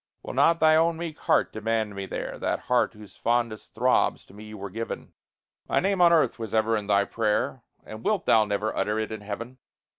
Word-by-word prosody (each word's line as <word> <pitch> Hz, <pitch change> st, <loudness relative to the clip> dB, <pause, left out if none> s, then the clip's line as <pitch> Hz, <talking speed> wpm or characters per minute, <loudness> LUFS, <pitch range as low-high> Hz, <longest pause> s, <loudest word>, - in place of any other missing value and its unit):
Will -, -, -6 dB
not 165 Hz, 0 st, +4 dB
thy 155 Hz, 0 st, +5 dB
own 165 Hz, +1 st, +3 dB
meek 165 Hz, -2 st, -6 dB
heart -, -, +2 dB
demand 110 Hz, -1 st, -1 dB
me 100 Hz, -1 st, -5 dB
there? -, -, -5 dB
That -, -, -1 dB
heart 125 Hz, -2 st, +1 dB
whose 105 Hz, -3 st, -13 dB
fondest 115 Hz, -2 st, -1 dB
throbs 125 Hz, +3 st, +2 dB
to -, -, -18 dB
me 105 Hz, +1 st, -11 dB
were 100 Hz, -1 st, -7 dB
given? 115 Hz, +3 st, -6 dB, 0.6 s
My -, -, +3 dB
name 195 Hz, 0 st, +1 dB
on 170 Hz, -1 st, +7 dB
earth 155 Hz, -8 st, +3 dB
was 110 Hz, -2 st, -4 dB
ever 110 Hz, +1 st, +2 dB
in 105 Hz, -2 st, -3 dB
thy 100 Hz, -1 st, +3 dB
prayer, 110 Hz, +4 st, -1 dB, 0.2 s
And 110 Hz, +1 st, -9 dB
wilt 210 Hz, -3 st, 0 dB
thou 110 Hz, -, +5 dB
never 105 Hz, +1 st, -2 dB
utter 105 Hz, +1 st, 0 dB
it 110 Hz, 0 st, -2 dB
in 110 Hz, -1 st, -6 dB
heaven? 115 Hz, +5 st, -7 dB
110 Hz, 210 wpm, -26 LUFS, 105-130 Hz, 0.6 s, on